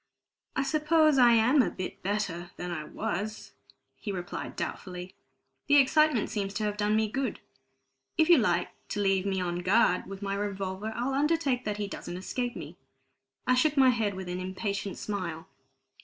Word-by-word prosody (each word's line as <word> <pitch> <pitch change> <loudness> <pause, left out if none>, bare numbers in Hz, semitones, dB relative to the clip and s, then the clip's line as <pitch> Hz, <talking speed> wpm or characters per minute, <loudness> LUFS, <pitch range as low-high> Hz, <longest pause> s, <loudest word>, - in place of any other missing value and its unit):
"I 270 - +1
suppose 310 0 +3
I 240 -1 +7
am 240 +5 +5
a - - +1
bit 185 - -6
better 185 -3 -2
than 180 0 -4
I 155 -3 -4
was," 210 +8 -4 0.5
he 205 - -5
replied 180 -2 -5
doubtfully. 180 0 -5 0.5
"The 290 - +5
excitement 285 -2 +4
seems 200 -2 -3
to 215 - -1
have 210 -1 -1
done 210 0 +1
me 220 0 +2
good. 260 +1 -2 0.8
If 320 - +4
you 345 -4 +7
like 180 -5 +1 0.2
to 205 - -3
leave 195 -1 +2
me 190 -1 0
on 175 -1 -2
guard 185 0 +3
with 195 +1 -8
my 195 0 -1
revolver, 200 0 -3
I'll 250 +3 -1
undertake 285 -3 +1
that 210 -1 -2
he 205 -1 -2
doesn't 175 -2 -6
escape 245 +6 -3
me." - - -8 0.7
I 255 - +4
shook 290 +4 +2
my 265 -1 +7
head 220 -5 -1
with 190 -1 -6
an 180 0 -3
impatient 195 +2 -3
smile. 180 -5 -4
205 Hz, 175 wpm, -29 LUFS, 185-255 Hz, 0.8 s, I